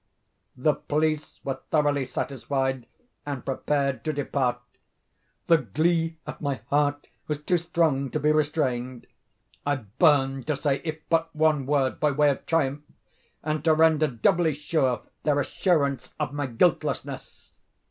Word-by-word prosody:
The 150 +4 +3
police 155 +1 -1
were 135 -1 -3
thoroughly 145 -3 +2
satisfied 130 -1 -2 0.4
and 145 -3 -5
prepared 140 0 -1
to 155 - +1
depart. 135 -4 -1 0.9
The 165 -1 +5
glee 160 - 0
at - - -8
my 140 -3 -2
heart 145 0 +1 0.2
was 150 -1 -3
too 175 +2 +2
strong 160 -5 +1
to 155 - -2
be 150 +1 +3
restrained. 130 -5 -1 0.6
I 145 0 +1
burned 135 - +2
to 155 - +1
say 140 -1 0
if 155 -2 -5
but 165 0 +2
one 155 -3 +2
word, 140 -2 +1
by 150 - +3
way 145 +1 +3
of 135 - -6
triumph, 145 -3 +1 0.6
and 155 -1 -2
to 160 -1 +4
render 160 -1 +4
doubly 155 +6 +2
sure 140 -5 0 0.2
their 145 -2 +2
assurance 140 -5 0
of 130 - -2
my 145 -1 -2
guiltlessness. 115 -3 -1
145 Hz, 140 wpm, -26 LUFS, 135-155 Hz, 0.9 s, The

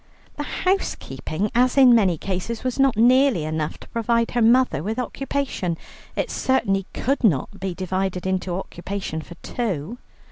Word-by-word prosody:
The - - -4
housekeeping, 210 - -2
as 250 +2 +3
in 260 -3 +8
many 195 -7 +4
cases, 195 +6 -4
was 255 +1 -2
not 270 -5 +3
nearly 250 - +4
enough 155 0 -2
to - - -12
provide 230 0 +1
her 240 - 0
mother 235 - +4
with 215 +6 -3
occupation. 255 -8 -2 0.4
It - - -1
certainly 195 -7 +1
could 275 +2 -1
not 200 - +1
be 190 -2 -3
divided 185 0 -2
into 185 -1 -1
occupation 190 -2 -5
for 175 - -11
two. 215 - -3
210 Hz, 150 wpm, -23 LUFS, 180-250 Hz, 0.4 s, in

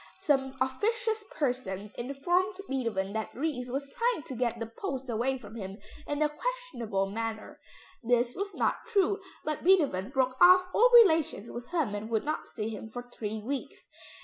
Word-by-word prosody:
Some 270 -8 +1
officious 440 - 0
person 230 -8 -2
informed 350 +10 0
Beethoven 225 -7 -1
that 220 0 -2
Ries 265 -3 -2
was 275 +2 -3
trying 470 -9 +1
to - - -7
get 235 -1 0
the 230 - -2
post 260 - -5
away 250 +4 0
from 215 -4 -12
him 195 -3 -6 0.3
in 290 +1 0
a - - +4
questionable 300 - -2
manner. 225 0 -4 0.4
This 240 0 +2
was 400 +1 -4
not - - 0
true, 400 -2 +2 0.2
but 305 0 -2
Beethoven 295 - +3
broke 260 -1 0
off 365 +1 +8
all 485 +3 +6
relations 320 - 0
with 240 0 -7
him 315 -12 0
and 205 +2 -4
would 225 +1 0
not 305 +1 -3
see 215 0 -4
him 220 0 -6
for 245 +2 -7
three 215 -2 -4
weeks. 275 +3 -5
260 Hz, 170 wpm, -30 LUFS, 225-350 Hz, 0.4 s, off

